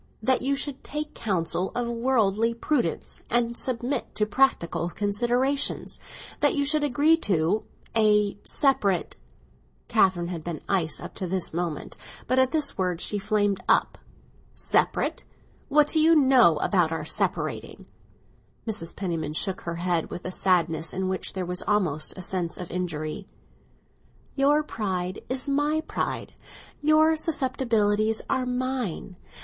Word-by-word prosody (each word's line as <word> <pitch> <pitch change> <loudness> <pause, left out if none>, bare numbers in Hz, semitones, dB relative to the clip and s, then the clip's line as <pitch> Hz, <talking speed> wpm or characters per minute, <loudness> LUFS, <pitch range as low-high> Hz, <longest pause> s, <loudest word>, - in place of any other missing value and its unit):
"That 260 +3 +2
you 275 +2 +1
should 275 -1 -4
take 300 +1 -4
counsel 185 -2 -1
of 245 -1 -1
worldly 230 -2 +1
prudence, 235 - -2
and 235 0 +1
submit 250 +1 -1
to 210 - +1
practical 205 -8 +1
considerations. 240 +9 0 0.4
That - - +3
you 285 -1 +1
should 300 +1 +2
agree 290 +4 +3
to—a—separate." 210 - 0 0.7
Catherine 175 -2 +2
had 170 -3 -5
been 170 -2 -5
ice 175 -5 0
up - - -8
to 185 - -4
this 180 -2 -1
moment, 170 -3 -4 0.3
but 255 - +2
at 260 0 +3
this 305 -9 0
word 180 -2 0
she 205 +3 0
flamed 205 -1 0
up. - - +2 0.6
"Separate? - - 0 0.5
What 295 +1 +4
do 320 - +4
you 325 +1 +6
know 260 - +5
about 175 -5 +2
our 165 - -3
separating?" - - -2 0.8
Mrs. 210 -7 -3
Penniman 165 -6 -3
shook 190 +2 -1
her 170 0 -4
head 175 -1 -1
with 180 - -7
a 185 - -3
sadness 165 -4 +1
in 190 0 -2
which 190 - -2
there 185 -1 -3
was 180 +1 -3
almost 180 -8 +1
a 185 - -5
sense 175 -2 -2
of 180 - -7
injury. 170 +1 -4 1.1
"Your 290 +2 +3
pride 185 -8 -3
is 260 +2 -1
my 290 +3 +1
pride, - - -3 0.5
and 300 - -2
your 315 +1 +5
susceptibilities 230 -8 0
are 255 -1 0
mine. 250 -8 -3
210 Hz, 140 wpm, -26 LUFS, 180-265 Hz, 1.1 s, you